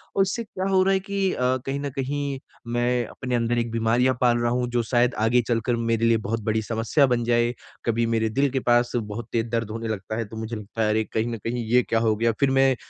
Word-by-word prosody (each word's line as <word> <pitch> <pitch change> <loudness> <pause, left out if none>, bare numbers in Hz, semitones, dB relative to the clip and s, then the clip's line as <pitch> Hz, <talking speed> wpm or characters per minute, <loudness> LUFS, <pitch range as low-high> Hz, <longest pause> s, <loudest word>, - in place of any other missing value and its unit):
और 195 - +3
उससे 195 +5 0
क्या 190 -3 -5
हो 190 -1 +4
रहा 195 +1 +3
है 190 - +2
कि 195 0 -1
अ, - - -6 0.3
कहीं 135 +1 -2
न 140 0 -3
कहीं 140 0 -2 0.3
मैं 120 0 0
अपने 125 -2 -4
अंदर 120 0 0
एक 115 -1 -1
बीमारियाँ 115 +3 +2
पाल 120 -1 +4
रहा 120 0 0
हूँ 125 0 0
जो 120 -1 +1
शायद 120 +2 +2
आगे 115 +3 +3
चल 120 -2 +2
कर 120 - +1
मेरे 115 0 0
लिए 115 -1 +4
बहुत 110 +1 -3
बड़ी 110 +1 0
समस्या 115 +6 +2
बन 120 -2 +1
जाए। 120 0 +2 0.3
कभी 115 0 +1
मेरे 115 -1 +1
दिल 140 +5 +1
के 135 - 0
पास 120 0 +2
बहुत 110 0 -4
तेज़ 115 0 0
दर्द 115 -2 -1
होने 115 +1 -4
लगता 110 0 -4
है 115 - -2
तो 110 +2 -10
मुझे 110 +1 -4
लगता 105 +1 -6
है 105 - +2
अरे, 110 +1 +2
कहीं 110 +2 -2
न 115 - -3
कहीं 115 +3 -3
ये 125 +3 +4
क्या 115 - 0
हो 110 -1 +2
गया? 115 +2 +2
फिर 140 -1 +3
मैं 135 0 +4
120 Hz, 260 wpm, -24 LUFS, 115-130 Hz, 0.3 s, हो